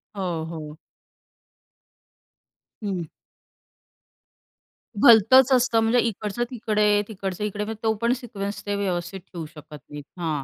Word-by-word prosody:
हो, 175 -5 -3
हो. 155 -2 -8 2.1
हं. 185 -5 -3 2.0
भलतंच 240 +4 +7
असतं, 250 -2 +3
म्हणजे 225 +2 +3
इकडचं 220 0 -1
तिकडे, 210 -3 +2
तिकडचं 195 -2 -5
इकडे. 210 0 -2
म्हणजे 215 0 -6
तो 220 0 +2
पण 235 +1 +3
सिक्वेन्स 205 -4 -6
ते 205 0 -1
व्यवस्थित 190 -1 -3
ठेऊ 175 -2 -9
शकत 150 -1 -12
नाहीत 145 0 -8 0.2
हां. 155 -5 -2
205 Hz, 115 wpm, -24 LUFS, 175-225 Hz, 2.1 s, भलतंच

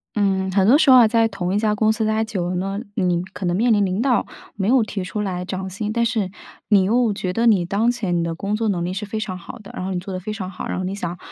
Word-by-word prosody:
嗯。 200 -2 +2
很 190 0 +3
多 265 - +7
时 300 -3 +3
候 255 - +9
啊， 240 -3 +7
在 225 0 +3
同 190 -4 -3
一 205 - +2
家 210 -1 +1
公 215 +1 +3
司 220 0 -1
待 220 +1 +1
久 195 -6 -3
了 180 - -2
呢， 195 +2 -2 0.2
你 180 -3 +1
可 190 - -5
能 175 0 +1
面 230 +4 +2
临 205 -1 +3
领 190 +3 -1
导 250 -1 +2 0.3
没 195 -1 -2
有 255 +2 +5
提 205 -3 -4
出 210 +3 -4
来 180 -3 -3
涨 190 0 -4
薪。 205 +3 -4
但 235 0 +1
是 220 -6 -1 0.4
你 200 -3 +5
又 225 +2 +2
觉 185 -2 -3
得 230 +4 +1
你 200 -7 +4
当 205 +6 +1
前 200 -7 -2
你 170 - 0
的 165 0 -2
工 200 +5 -2
作 225 +1 -1
能 175 -3 -1
力 180 - -3
是 205 +3 -4
非 215 +2 -4
常 185 -4 -4
好 185 +7 -10
的， 210 - -12
然 185 - -4
后 190 - -2
你 180 - -1
做 190 +2 -7
得 185 - -3
非 205 +4 -5
常 190 -4 -5
好， 190 - -7
然 - - -3
后 185 - -2
你 190 +2 -3
想 175 -3 -4
200 Hz, 330 characters per minute, -21 LUFS, 185-220 Hz, 0.4 s, 候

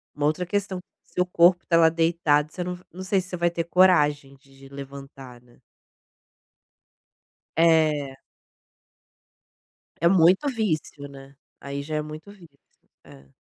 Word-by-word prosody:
uma 145 0 0
outra 180 +4 -1
questão. 195 0 -3 0.2
Seu 180 - -2
corpo 175 0 +3
tá 170 - +1
lá 165 -1 +6
deitado 160 -2 +1
você 180 - -5
não 180 0 -5
não 185 - -10
sei 190 0 0
se 185 - -12
você 180 - -5
vai 170 0 +1
ter 170 -1 -3
coragem 150 -6 +2
de 135 0 -18
levantar, 135 -2 -11
né. 120 -1 -24 2.0
É. 155 -5 +2 1.8
É 170 - +4
muito 185 - +4
vício, 160 - -3
né. 135 0 -14 0.2
Aí 140 0 -6
já 155 +1 -5
é 150 - 0
muito 155 +6 -10
vício. 170 -8 -18 0.5
É. 70 0 -17
160 Hz, 140 wpm, -24 LUFS, 140-180 Hz, 2.0 s, lá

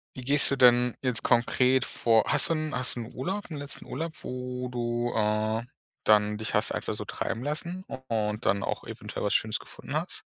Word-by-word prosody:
Wie 130 - -7
gehst 140 +2 +5
du 140 - +1
denn 125 -1 +5
jetzt 125 -3 +2
konkret 125 +2 +3
vor? 115 -2 +3
Hast - - +5
du - - +3
'n 155 -1 -1
hast 125 0 +1
du 120 - -4
'n 115 - -9
Urlaub, 190 +9 -4
'n 150 - -4
letzten 140 0 -5
Urlaub, 160 +4 -4
wo 125 0 -5
du 120 0 -2
äh, 110 +1 0 0.4
dann 105 0 +3
dich 110 - -3
hast - - +2
einfach - - -3
so - - -5
treiben 115 +2 -4
lassen 170 +5 -3
u 135 - -6
und 105 -1 -2
dann 100 +1 +2
auch - - -3
eventuell - - -7
was 105 - +1
Schönes 110 -2 +1
gefunden - - -10
hast? - - -2
125 Hz, 210 wpm, -27 LUFS, 110-135 Hz, 0.4 s, gehst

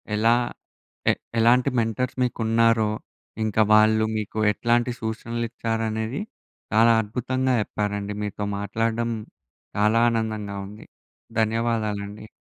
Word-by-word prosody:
ఎలా 115 +2 +4 0.8
ఎ - - +2 0.3
ఎలాంటి 125 +4 +4
మెంటర్స్ 115 +3 -1
మీకున్నారో, 115 -2 +2 0.5
ఇంకా 110 0 +1
వాళ్ళు 110 0 +5
మీకు 110 0 -4
ఎట్లాంటి 120 +3 +1
సూచనలు 115 +1 -3
ఇచ్చారనేది, 115 - -2 0.5
చాలా 115 +2 +6
అద్భుతంగా 130 +4 -1
చెప్పారండి. 105 -1 -3
మీతో 105 0 -4 0.2
మాట్లాడడం 115 +3 -1 0.7
చాలా 105 +2 +3
ఆనందంగా 110 -3 -2
ఉంది. 105 +2 -12 0.5
ధన్యవాదాలండి. 110 -2 -1
110 Hz, 95 wpm, -24 LUFS, 105-115 Hz, 0.8 s, చాలా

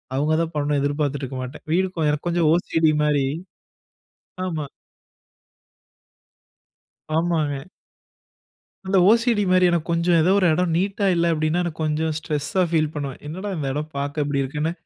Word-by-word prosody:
அவுங்கதான் 155 +4 0
பண்ணனு 145 -1 0
எதிர்பார்த்துட்டுருக்க 145 -2 -2
மாட்டேன். 125 +2 -9
வீடு 190 +2 +2 0.2
எனக்கு 150 +3 -2
கொஞ்சம் 170 -2 +2
ஓசிடி 165 -2 +2
மாரி. 145 -2 +2 1.2
ஆமா. 160 -5 -3 2.5
ஆமாங்க. 160 -3 -1 1.2
அந்த 190 +1 +2
ஓசிடி 230 -2 +2
மாரி 185 0 +5
எனக்கு 170 -2 0
கொஞ்சம் 170 0 +2
ஏதோ 175 +4 +3
1 190 - +2
எடம் 170 +1 0
நீட்டா 195 +3 0
இல்ல 170 0 +2
அப்பிடின்னா 155 +2 0
எனக்கு 170 -2 -5
கொஞ்சம் 155 +1 0
ஸ்ட்ரெஸ் 150 -2 -3
ஸா 190 - +3
ஃபீல் 155 -2 +2
பண்ணுவேன். 140 -3 -5
என்னடா 185 +7 -5
இந்த 150 -4 -3
எடம் 150 +3 -4
பார்க்க 145 +2 -2
இப்பிடி 140 -1 -1
இருக்குன்னு, 150 +4 -2
155 Hz, 135 wpm, -22 LUFS, 145-175 Hz, 2.5 s, மாரி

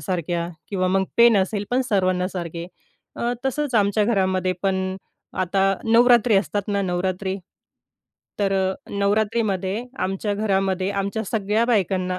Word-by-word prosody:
सारख्या 170 +1 -2 0.2
किंवा 185 -2 0
मग 190 +1 +2
पेन 235 -2 +6
असेल 200 +1 0
पण 250 - +2
सर्वांना 185 -2 +1
सारखे. 170 -2 -5 0.5
अ, 240 +1 -1
तसंच 270 0 -1
आमच्या 205 0 +3
घरामध्ये 185 -4 +1
पण 195 -1 +1 0.7
आता 190 +2 0 0.2
नवरात्री 235 -1 +5
असतात 205 +1 -1
ना 200 -1 0
नवरात्री 185 +1 -2 1.0
तर 195 -1 +1 0.2
अ, - - -3 0.2
नवरात्रीमध्ये 205 0 0
आमच्या 195 +2 -1
घरामध्ये 195 -2 0
आमच्या 200 +2 -2
सगळ्या 215 +1 +1
बायकांना 185 -5 0
195 Hz, 130 wpm, -23 LUFS, 185-215 Hz, 1.0 s, पेन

